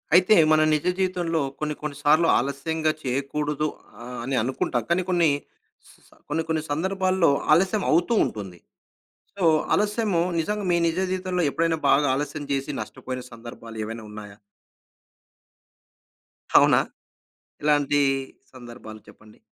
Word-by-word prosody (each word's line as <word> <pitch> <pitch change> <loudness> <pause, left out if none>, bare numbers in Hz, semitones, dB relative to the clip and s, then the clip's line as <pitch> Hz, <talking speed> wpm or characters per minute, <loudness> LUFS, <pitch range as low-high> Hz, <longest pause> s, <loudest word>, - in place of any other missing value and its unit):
అయితే 185 +4 +6 0.2
మన 155 - +5
నిజ 150 - 0
జీవితంలో 175 -3 0 0.2
కొన్ని 150 0 -2
కొన్ని 150 -1 -5
సార్లు 155 +3 +4
ఆలస్యంగా 155 +3 -1
చేయకూడదు. 145 +3 -2 0.4
ఆహ్, 125 +1 -8
అని 135 +2 -2
అనుకుంటాం. 125 -1 -1
కానీ 175 +2 +2
కొన్ని 175 -2 +3 0.6
స్ - - -16 0.2
స - - -25 0.2
కొన్ని 165 - -1
కొన్ని 160 -1 0
సందర్భాల్లో 185 +2 +1 0.2
ఆలస్యం 190 +5 +2
అవుతూ 175 +8 +2
ఉంటుంది. 95 -5 -7 0.8
సో 195 - -4 0.3
ఆలస్యము 210 -4 +1 0.2
నిజంగా 210 +5 -2
మీ 175 - +3
నిజ 165 +1 -2
జీవితంలో 185 -1 -1
ఎప్పుడైనా 165 +2 0
బాగా 145 +1 +4
ఆలస్యం 145 +1 -4
చేసి, 135 +1 -2
నష్టపోయిన 130 -1 -7
సందర్భాలేవైనా 115 -1 -8
ఉన్నాయా? 105 -1 -10 2.2
అవునా? - - +6 0.8
ఎలాంటి 145 -1 +2 0.5
సందర్భాలు 120 -3 -11
చెప్పండి? 105 0 -18
150 Hz, 120 wpm, -24 LUFS, 130-175 Hz, 2.2 s, అయితే